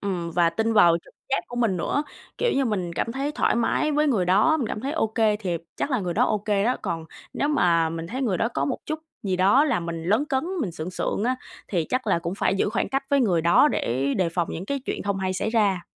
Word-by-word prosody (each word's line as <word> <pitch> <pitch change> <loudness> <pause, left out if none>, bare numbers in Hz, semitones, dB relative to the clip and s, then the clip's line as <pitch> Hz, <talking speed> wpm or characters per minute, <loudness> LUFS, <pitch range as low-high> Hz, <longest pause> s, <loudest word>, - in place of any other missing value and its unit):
ừm, 180 -4 -3
và 170 0 +3
tin 220 +7 0
vào 175 -6 +6
trực - - -20 0.2
giác 270 - +2
của 245 - -7
mình 225 -6 +1
nữa. 225 - 0 0.4
Kiểu 485 - +1
như, 275 - +1
mình 190 -7 -2
cảm 230 +7 -2
thấy 275 +3 -2
thoải - - +1
mái 235 +6 +1
với 300 +1 +2
người 210 -10 +2
đó, 205 - +4
mình 270 -7 -2
cảm - - -4
thấy 275 +4 -3
ô 320 -8 +1
kê 220 -1 +1
thiệp 180 -6 -3
chắc - - -2
là 255 -5 +1
người 180 -3 -3
đó - - +3
ô 215 - +1
kê 205 -1 0
đó. 250 +3 +1
Còn 165 -1 -3 0.3
nếu 290 - -1
mà 170 - +3
mình 165 0 -5
thấy 255 +10 -4
người 210 -8 +1
đó 230 - +1
có - - +1
một 260 - -2
chút 310 0 -2 0.2
gì 190 -3 -1
đó 200 +10 +5
làm 240 - 0
mình 165 -1 -4
lấn 220 - +2
cấn 270 -2 -1 0.2
mình 200 - -2
sượng 160 +1 -5
sượng 200 +3 -2
á, 255 +1 +1 0.3
thì 175 -5 0
chắc 255 -1 -1
là 190 - +2
cũng 170 +2 -4
phải 195 - +1
giữ 195 - +1
khoảng - - -1
cách 270 0 -1
với 280 -1 +4
người 185 -9 +2
đó 170 - +5
để 135 - -1
đề 185 -3 +1
phòng 170 0 -1
những 180 +4 -5
cái 280 +3 -2
chuyện - - -3
không 200 -1 -1
hay 190 -1 -1
xảy 185 +3 -2
ra. 200 -6 +1
205 Hz, 275 wpm, -24 LUFS, 175-255 Hz, 0.4 s, vào